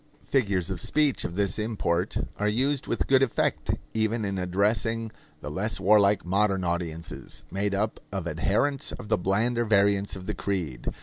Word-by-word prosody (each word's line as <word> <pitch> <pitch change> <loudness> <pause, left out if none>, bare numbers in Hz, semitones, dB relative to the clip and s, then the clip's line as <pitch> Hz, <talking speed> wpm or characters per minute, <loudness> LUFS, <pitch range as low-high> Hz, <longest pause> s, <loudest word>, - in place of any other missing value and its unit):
Figures 100 -9 +1
of 90 - -3
speech 150 -3 +2
of 85 - -4
this 100 0 0
import 95 -5 -1 0.2
are 105 - 0
used 130 +6 +1
with - - -1
good 135 -1 +4
effect 135 -4 +1 0.2
even 110 0 0
in 100 -1 -2
addressing 105 +5 0 0.3
the 75 - -6
less 100 +8 -2
warlike 100 0 +4
modern 95 +1 +2
audiences, 85 -1 -4
made 100 +2 0
up 105 +2 -1
of 95 -3 -3
adherents 130 +10 0
of 110 -4 -8
the - - +3
blander 115 +6 +1
variants 100 -2 +2
of 95 -1 -8
the 105 - -2
creed. 90 -9 -3
100 Hz, 165 wpm, -27 LUFS, 95-110 Hz, 0.3 s, good